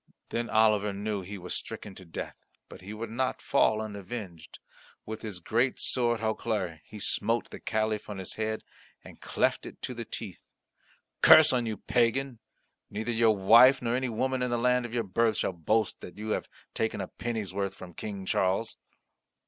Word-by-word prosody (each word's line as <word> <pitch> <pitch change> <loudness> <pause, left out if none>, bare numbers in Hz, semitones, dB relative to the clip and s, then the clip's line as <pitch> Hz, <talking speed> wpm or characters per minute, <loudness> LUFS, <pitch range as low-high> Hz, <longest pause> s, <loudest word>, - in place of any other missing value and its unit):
Then 120 0 -2
Oliver 105 -2 +3
knew 100 0 -2
he 100 +3 -7
was 90 -1 -5
stricken 105 -3 -5
to 95 - -12
death, 80 - -6 0.3
but - - -11
he 95 +3 -8
would 110 +1 -6
not 130 +2 -1
fall 110 -6 +2
unavenged. 100 -4 -7 0.5
With 110 0 -6
his 105 -5 -6
great 120 +8 +1
sword 120 -2 +1
Hautclere 110 -6 -1
he 110 - -10
smote 115 +3 0
the - - -8
Caliph 110 -1 -1
on 105 - -5
his 95 -1 -6
head 110 0 -2 0.4
and - - -14
cleft - - 0
it - - -11
to - - -3
the - - -5
teeth. - - -7 0.8
"Curse 155 -2 +9
on 120 -2 +1
you, 110 -2 -3
pagan. 120 +3 +1 0.5
Neither 110 +3 -3
your 115 -2 +3
wife 120 +7 +7
nor 120 0 0
any 130 0 0
woman 130 +3 -1
in 125 - 0
the 120 - +1
land 125 0 +2
of 120 - -12
your 115 - +1
birth 110 +2 +1
shall - - 0
boast 105 +6 0
that 90 - -10
you 110 +1 -5
have - - -2 0.2
taken 110 -2 -1
a 95 - -3
penny's 110 -6 -4
worth 100 0 -2
from 90 -2 -10
King 100 +1 -6
Charles!" 95 +4 0
110 Hz, 185 wpm, -29 LUFS, 100-120 Hz, 0.8 s, Curse